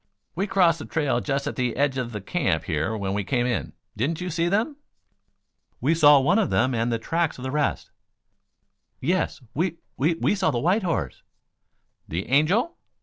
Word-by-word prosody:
"We 190 +5 -1
crossed 175 -4 +3
the - - -7
trail 145 -6 0
just 140 -1 -1
at 145 - -3
the 125 -2 -1
edge 140 -1 +1
of 120 -2 -3
the 105 -3 -5
camp 95 - 0
here 80 +7 -1
when 95 -2 -2
we 100 0 -1
came 120 +4 0
in. 110 -10 -2 0.2
Didn't 140 +9 -1
you 180 0 -4
see 165 +2 0
them?" 225 - 0 1.0
"We 160 - +2
saw 145 -3 +7
one 170 +11 +3
of 215 - +1
them 130 +2 +2
and 115 +1 0
the 115 - +1
tracks 165 +7 -1
of 125 - -9
the 130 - -3
rest 150 0 -1 0.6
" - - -51
"Yes, 160 -6 -2
we 170 +2 -1 0.2
we 160 +5 +2
we 165 - +1
saw 195 -5 +1
the 130 - -1
white 180 - +2
horse 175 -4 -2 0.4
" - - -49
"The 85 +4 -4
Angel?" 190 - +2
145 Hz, 200 wpm, -25 LUFS, 120-170 Hz, 1.0 s, saw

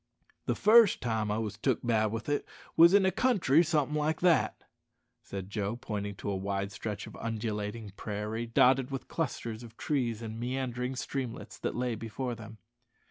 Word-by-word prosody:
"The - - +1
fust 220 -1 +6
time 110 -3 -1
I 105 - 0
wos 110 -2 -3
took 125 0 0
bad 110 -2 +3
with 115 +2 -4
it 145 0 0 0.3
wos 170 +4 +8
in 200 -1 +5
a 190 - +4
country 180 - +4
somethin' 150 -3 +1
like 155 +1 0
that," 175 -2 +3 0.6
said 95 -1 -6
Joe, 105 +1 -1
pointing 105 -4 -4
to 100 - -5
the - - -1
wide 100 +1 -2
stretch 105 +1 -5
of - - -11
undulating 110 -1 -3
prairie, 105 +3 -4
dotted 125 +3 +4
with 135 -1 -5
clusters 115 -8 -3
of 115 -1 -12
trees 120 -7 -1
and 110 0 -6
meandering 125 0 -2
streamlets, 130 -2 -5
that - - -2
lay 125 0 0
before 115 +3 -4
them. 110 -1 -10
115 Hz, 175 wpm, -30 LUFS, 110-135 Hz, 0.6 s, wos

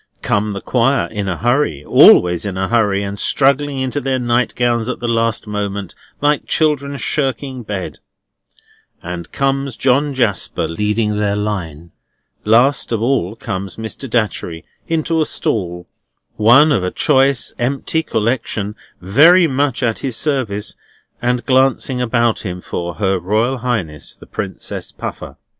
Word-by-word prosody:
Come 105 0 0
the 100 - -5
Choir 130 +1 +1
in 100 -3 -3
a 90 - -2
hurry 120 - 0
(always 90 -1 +6
in 100 -2 -4
a 95 0 -1
hurry, 105 -4 +2
and 100 0 -5
struggling 140 +2 +2
into 130 +2 -2
their 130 0 0
nightgowns 120 -1 0
at 125 - -3
the 120 - -3
last 115 -1 0
moment, 100 -3 -4 0.3
like 145 0 +1
children 140 -3 0
shirking 135 -1 -2
bed), 105 -4 -5 1.0
and 85 -1 -6
comes 135 -1 -1
John 140 +2 +1
Jasper 110 -8 0
leading 105 +4 -1
their 100 -1 0
line. 85 -6 -4 0.5
Last 120 +6 +3
of 115 - 0
all 115 -5 0
comes 100 -4 -5
Mr. 110 +4 -6
Datchery 100 -8 -2 0.2
into 165 0 0
a - - +2
stall, 90 -4 -2 0.5
one 120 +8 +6
of 115 -10 +1
a 90 - 0
choice 135 +4 +2
empty 135 +6 0
collection 110 -5 -2 0.3
very 155 - +6
much 135 -3 0
at 115 -2 0
his 130 -5 -3
service, 125 -9 -1 0.5
and 120 -1 0
glancing 130 -1 +2
about 120 -1 +1
him 90 -3 -5
for 85 -1 -5
Her 95 -2 0
Royal 110 +8 0
Highness 95 - -3
the - - -15
Princess - - -6
Puffer. - - -7
115 Hz, 145 wpm, -17 LUFS, 100-135 Hz, 1.0 s, always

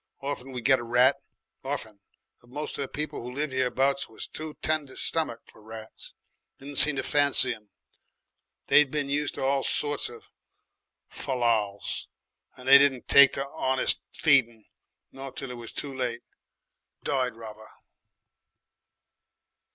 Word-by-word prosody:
Orfen 135 -2 -5
we 125 -1 -5
got 135 +1 +4
a - - -6
rat. 125 +3 +4 0.5
Orfen. 125 -7 -5 0.4
But 120 - -23
moce 150 +4 -5
of - - -6
the 140 - -3
people 150 +1 -5
who 125 +1 -7
lived 145 -1 -2
hereabouts 135 +2 0
was 110 - -6
too 155 -1 -7
tender 155 -4 -1
stummicked 155 -8 -2
for - - -19
rats. 110 0 -11 0.4
Didn't 140 +1 -8
seem 150 -1 +7
to - - -2
fancy 140 -3 +3
'em. 105 -2 -16 1.0
They'd 150 -2 +5
been 145 -1 -2
used 145 0 -1
to - - -4
all 135 +1 +1
sorts 145 -1 0
of 120 -1 -13 0.8
fallals, 115 -6 -2 0.5
and 125 0 -12
they 140 +1 +9
didn't 135 -3 +2
take 140 -1 +7
to 135 - -2
'onest 130 -1 +1
feeding, 120 -7 +2 0.5
not 135 0 -10
till 135 -2 -5
it - - -6
was 120 -2 -9
too 140 -2 -6
late. 125 -2 -3 0.8
Died 130 -4 -1
rather. 110 -1 -11
135 Hz, 145 wpm, -27 LUFS, 120-140 Hz, 1.0 s, they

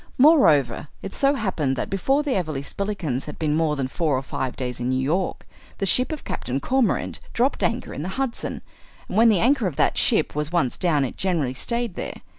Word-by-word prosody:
Moreover, 155 - +5 0.2
it 195 - -6
so 275 +1 +2
happened 165 - -1
that - - -3
before 270 +9 +1
the 285 -3 0
Everleigh 155 -7 -2
Spillikinses 170 -8 -3
had 150 - -8
been 155 -2 0
more 160 -2 +1
than 135 -2 -2
four 150 0 0
or 130 - -3
five 130 -1 -4
days 125 -2 -4
in 125 +1 -2
New 130 0 +1
York 165 +8 -1 0.3
the 195 - -1
ship 250 - +3
of 310 - -5
Captain 130 +2 -3
Cormorant 250 - 0
dropped 255 +4 +1
anchor 235 +2 -1
in - - -5
the 175 - -3
Hudson; 265 -3 -3 0.4
and - - -6
when 230 +2 +6
the 205 -5 +3
anchor 250 -1 +3
of 165 - -4
that - - +2
ship - - +2
was 150 +1 -2
once 165 -8 +1
down 150 -6 +2
it 125 - -6
generally 165 -9 0
stayed 235 - -2
there. - - -5
175 Hz, 215 wpm, -23 LUFS, -, 0.4 s, when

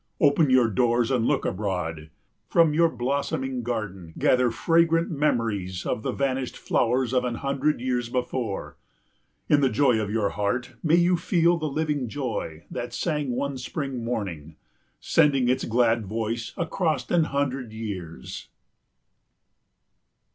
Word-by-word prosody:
Open 145 0 +4
your 130 -2 +5
doors 120 +2 +2
and 120 -3 +2
look - - +1
abroad. 85 -5 -3 0.4
From 165 -3 +4
your 165 +2 +4
blossoming 130 0 -2
garden 100 -8 -5
gather 125 -1 +3
fragrant 165 +6 +2
memories 115 - -1
of - - -1
the - - -2
vanished 135 -2 -2
flowers 125 +1 +1
of 125 -1 +2
an 125 -1 -2
hundred 140 +3 0
years 125 -1 -1
before. 125 -4 -3 0.7
In 145 - +4
the 135 - +4
joy 125 -1 +3
of 105 -2 -2
your 105 -1 +1
heart 120 +5 -2
may 160 0 +3
you 175 +1 +4
feel 170 0 +2
the 155 - -2
living 145 -4 -1
joy 110 - -4
that 120 0 -5
sang 150 -5 -1
one 140 0 -2
spring 135 -2 -4
morning, 90 -10 -4 0.4
sending 135 -4 +3
its 130 +1 +1
glad 115 -2 +2
voice 115 +2 -3
across 170 -1 -1
an 170 -2 +4
hundred 135 -5 -2
years. 95 - -7
125 Hz, 140 wpm, -25 LUFS, 110-145 Hz, 0.7 s, your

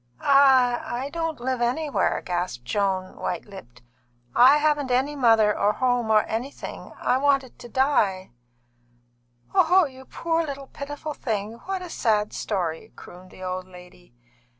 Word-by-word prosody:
"I 265 -1 +3
don't 325 -3 -3
live 255 0 -2
anywhere," 280 +5 0
gasped 175 -9 -3
Joan, 190 +1 -1
white 175 - -4
lipped. 125 - -13 0.5
"I 260 +4 +7
haven't 295 -2 +1
any 265 +4 +1
mother 225 -5 +4
or 210 - +2
any - - -14
home, 245 -3 +1
or 215 -1 +5
anything. 245 +6 -6
I 255 - +1
wanted 275 -2 +1
to 240 - -11
die." 215 - +1 1.2
"Oh, 370 -1 +5
you 265 -2 -11
poor 330 +3 -1
little 280 -3 -6
pitiful 290 +3 -7
thing! 220 -2 -4
What 380 -1 -3
a 360 - -8
sad 210 -3 0
story!" 175 -6 -3
crooned 180 +1 -13
the 185 - -12
old 185 0 -4
lady. 180 -5 -16
245 Hz, 145 wpm, -24 LUFS, 195-280 Hz, 1.2 s, I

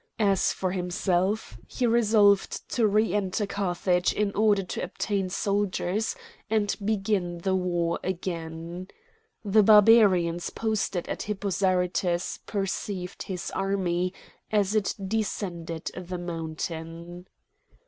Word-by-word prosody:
As 200 -4 +2
for 185 -1 -2
himself, 180 - -1
he 250 - -1
resolved 215 -4 +3
to 230 -3 +2
re 210 -1 +2
enter 205 0 0
Carthage 180 -2 0
in 210 -1 0
order 210 -2 +3
to 185 - -5
obtain 195 -3 -2
soldiers 200 - -1 0.3
and 210 -2 +1
begin 195 -4 0
the 190 +3 -1
war 175 -2 0
again. 170 -1 -4 0.6
The 210 +2 +5
Barbarians 200 -5 +5
posted 205 -5 -2
at - - -4
Hippo 205 -1 -3
Zarytus 180 -2 0
perceived 195 -2 -3
his 185 -2 -5
army 185 -2 0 0.4
as 205 -2 +2
it 215 -2 +1
descended 175 -6 -3
the 180 0 -5
mountain. 165 +1 -6
190 Hz, 110 wpm, -27 LUFS, 175-205 Hz, 0.6 s, The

